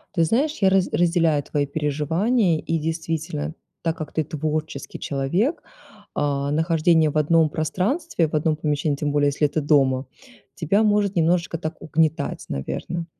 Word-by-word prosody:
Ты 165 - +3
знаешь, 280 - +1
я 190 - +5
раз 190 -1 +2
разделяю 165 -4 +2
твои 145 +1 -1
переживания, 160 - +1
и 165 -1 -2
действительно, 160 -1 -3 0.3
так 165 +1 -1
как 155 -3 -6
ты 160 - 0
творческий 155 -1 -4
человек, 175 - -1 0.5
э, - - -1 0.3
нахождение 160 0 +3
в 155 - -2
одном 155 +1 +3
пространстве, 180 - -1
в - - -14
одном 155 +1 +1
помещении, 150 -1 -1
тем 145 0 -2
более, 145 0 +2
если 145 +1 +1
это 155 +2 -2
дома, 135 -3 +2 0.5
тебя 195 +6 +2
может 205 -2 +2
немножечко 170 0 +1
так 155 0 -5
угнетать, 160 0 0
наверно. 165 - -4
160 Hz, 150 wpm, -23 LUFS, 150-175 Hz, 0.5 s, я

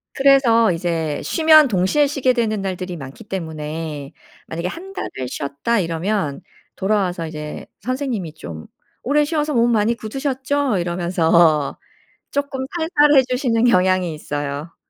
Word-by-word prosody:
그래서 255 -6 +5
이제 165 -3 -2
쉬면 315 -2 +6
동시에 200 +7 +2
쉬게 275 -3 +1
되는 215 -4 0
날들이 185 -2 -4
많기 140 +10 -10
때문에 155 -5 -5 0.4
만약에 170 +2 -4
1 370 - -8
달을 - - -4 0.2
쉬었다 140 - -2
이러면 170 -2 -2 0.3
돌아와서 190 -4 0
이제 150 -1 -7 0.2
선생님이 245 - -3
좀 80 - -9 0.3
"오래 295 +3 +2
쉬어서 300 -1 -1
몸 235 0 +3
많이 225 +1 +2
굳으셨죠?“ 265 +2 -1
이러면서 170 -3 +2 0.5
쪼끔 280 -2 -2
살살해 295 -4 +4
주시는 250 -3 +1
경향이 185 -6 +3
있어요. 145 +1 -5
195 Hz, 300 characters per minute, -20 LUFS, 165-265 Hz, 0.5 s, 쉬면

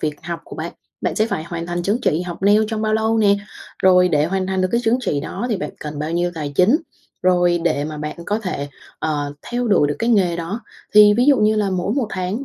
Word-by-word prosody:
việc 150 -1 -1
học 170 0 -5
của - - -10
bạn, - - -5 0.3
bạn - - -1
sẽ 215 - +2
phải 160 -8 -3
hoàn 170 0 -5
thành 175 0 -3
chứng 205 +6 0
chỉ 165 -4 +1
học 175 +1 -7
nail 205 +2 +5
trong 220 -1 -3
bao 215 0 +1
lâu 220 +1 +1
nè. 200 -2 +4 0.5
Rồi 180 -1 +5
để 150 -2 +2
hoàn 190 +2 -1
thành 190 0 -1
được 185 - +1
cái 235 - +2
chứng 235 +3 +3
chỉ 150 - -1
đó 235 +10 -4
thì 215 - +1
bạn 150 -4 -4
cần 150 -1 -6
bao 155 +2 -3
nhiêu 175 +1 0
tài 150 -3 -4
chính? 210 +10 +5 0.5
Rồi 175 -1 +3
để 145 -4 +1
mà 155 0 -5
bạn 150 +2 -5
có 210 - 0
thể, 180 -9 -4 0.3
ờ, 145 -2 -2 0.2
theo 245 -1 -1
đuổi 165 -8 +4
được 145 - -2
cái 230 +1 0
nghề 180 -6 +3
đó. 180 +7 -4 0.3
Thì 210 0 +8
ví 245 +3 +3
dụ 285 -2 +6
như 215 0 +3
là 205 -2 +1
mỗi 185 +3 -1
một 260 -6 0
tháng 190 +8 -3
185 Hz, 260 wpm, -20 LUFS, 165-215 Hz, 0.5 s, Thì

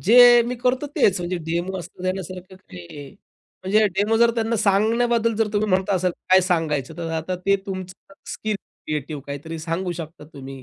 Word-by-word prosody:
जे 240 +3 +8
मी 250 - -2
करतो 250 +4 0
तेच, 195 -1 +3
म्हणजे 175 +1 -2
डेमो 175 +3 -2
असण्या-नसण्या 185 +2 -4
सारखं 185 +2 -10
काही, 140 - -11 0.5
म्हणजे 210 +3 +3
डेमो 210 +3 +2
जर 235 +1 +5
त्यांना 230 0 0
सांगण्याबद्दल 225 +3 +2
जर 225 -1 +1
तुम्ही 210 0 0
म्हणत 190 +2 +1
असाल 185 -2 +1 0.2
काय 185 0 +7
सांगायचं 160 -5 -1
तर 165 -1 -4
आता 165 +3 -2
ते 200 0 +5
तुमचं 185 0 -8 0.2
स्किल 215 -1 -3
क्रिएटिव्ह 150 -5 -6
काहीतरी 145 +4 -6
सांगू 170 +3 -3
शकता 165 -2 -8
तुम्ही 135 -1 -9
185 Hz, 170 wpm, -22 LUFS, 165-215 Hz, 0.5 s, जे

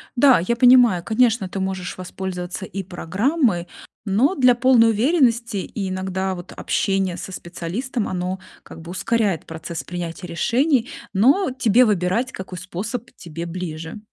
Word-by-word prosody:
Да, 260 0 +6
я 185 +8 0
понимаю, 245 -7 +6
конечно, 225 -2 +2
ты 195 - -5
можешь 190 -2 -3
воспользоваться 185 0 -5
и 195 +1 -5
программой, 190 - 0 0.4
но 225 - +2
для 250 -2 +5
полной 240 -2 +5
уверенности 235 - +1
иногда 190 -1 -2
вот 175 +1 -10
общение 195 -2 -1
со 190 - -7
специалистом, 190 +8 -4
оно 185 +1 -3 0.2
как - - -12
бы 170 +1 -9
ускоряет 205 -2 0
процесс 160 +1 -6
принятия 175 0 -6
решений, 250 - +1 0.2
но 270 - +3
тебе 250 -1 +4
выбирать, 210 +5 0
какой 185 -4 -8
способ 200 +7 -5
тебе 170 -1 -7
ближе. 165 +1 -6
195 Hz, 135 wpm, -22 LUFS, 180-240 Hz, 0.4 s, Да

